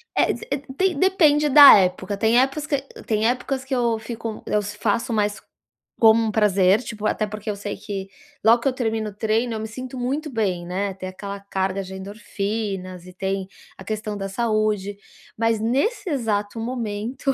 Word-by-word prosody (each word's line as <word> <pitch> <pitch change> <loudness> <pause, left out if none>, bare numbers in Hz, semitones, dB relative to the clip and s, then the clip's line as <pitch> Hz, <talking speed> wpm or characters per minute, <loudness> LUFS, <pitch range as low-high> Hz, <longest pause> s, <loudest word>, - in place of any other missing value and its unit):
É - - +3
d - - -8 0.3
tem 375 -4 +1
depende 300 -4 +4
da 285 0 +10
época. 190 +1 0
Tem 225 +3 +4
épocas 275 +3 0
que 285 - +1 0.3
tem 215 0 +1
épocas 260 +2 -1
que 265 - -4
eu 235 -2 +1
fico 225 -1 -6
eu 210 - +1
s 210 0 -6
faço 225 +3 0
mais 210 -1 0 0.6
como 225 0 +6
um 220 - -1
prazer, 200 -1 +3
tipo, 215 -3 -4
até 215 - 0
porque 215 +1 -6
eu 210 - -1
sei 205 0 -5
que, 195 -2 -6 0.4
logo 230 +2 +6
que 275 - -1
eu - - +3
termino 225 -3 -2
o - - -12
treino, 225 +3 0
eu 220 - -3
me 220 - -4
sinto 255 +4 -8
muito 280 +5 -2
bem, 195 -7 -1
né, 190 +3 -2
tem 185 0 -7
aquela 200 +1 -7
carga 195 -1 -2
de 190 0 -9
endorfinas, 195 -2 -5
e 180 - -12
tem 190 0 -3 0.3
a - - -10
questão 215 +1 -4
da 195 0 -4
saúde. 215 -2 0 0.4
Mas, 225 0 +1
nesse 320 - 0
exato 220 -5 -1
momento, 235 +2 -2
215 Hz, 185 wpm, -23 LUFS, 200-240 Hz, 0.6 s, da